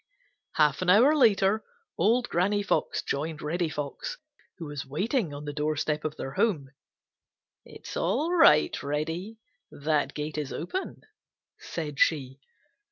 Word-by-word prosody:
Half 150 +2 +3
an 185 - 0
hour 245 +11 +6
later 215 -5 +4 0.3
old 235 +7 +2
Granny 205 +4 +1
Fox 205 - 0
joined 150 +2 -3
Reddy 165 +2 -1
Fox, 145 -2 -5 0.4
who 170 - -7
was 145 -2 -5
waiting 185 - -1
on 145 +1 -7
the 145 - -4
doorstep 150 0 -1
of 155 -1 -4
their 135 - -5
home. 145 -9 0 0.9
"It - - -13
is - - -6
all 330 +4 0
right, 150 - +6
Reddy; 160 +9 -3 0.3
that 150 0 -1
gate 150 +1 -3
is 145 -2 -4
open," 370 - -4 0.6
said 150 -4 -5
she. 135 -4 +1
155 Hz, 140 wpm, -27 LUFS, 150-205 Hz, 0.9 s, hour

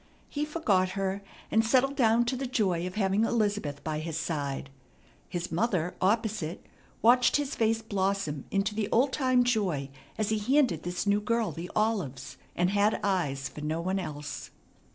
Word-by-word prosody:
He 295 +1 -2
forgot 215 - +1
her, 195 0 -1 0.3
and 225 - +4
settled 265 +4 +3
down 235 -2 +4
to 250 +2 -1
the 265 +1 -3
joy 185 -8 0
of 185 - -7
having 200 0 +2
Elizabeth 205 -11 0
by 155 -1 -2
his 160 0 -4
side. 140 -4 -3 0.6
His 175 0 -4
mother, 180 -2 0
opposite, 200 -4 0 0.4
watched 245 +2 +5
his 290 -2 0
face 225 0 +1
blossom 195 -8 -1
into 200 +2 0
the 210 -1 -2
old 260 +3 +3
time 255 -3 +3
joy 190 - 0 0.3
as 215 -1 0
he 220 -1 +1
handed 250 - +2
this 180 +2 -3
new 205 0 +2
girl 225 -2 0
the 170 +4 -7
olives, 195 - -1 0.2
and 180 +1 +2
had 205 +1 +2
eyes 145 -9 0
for 150 - -9
no 155 +2 -1
one 185 +3 -1
else. 150 -5 -6
200 Hz, 170 wpm, -29 LUFS, 170-225 Hz, 0.6 s, watched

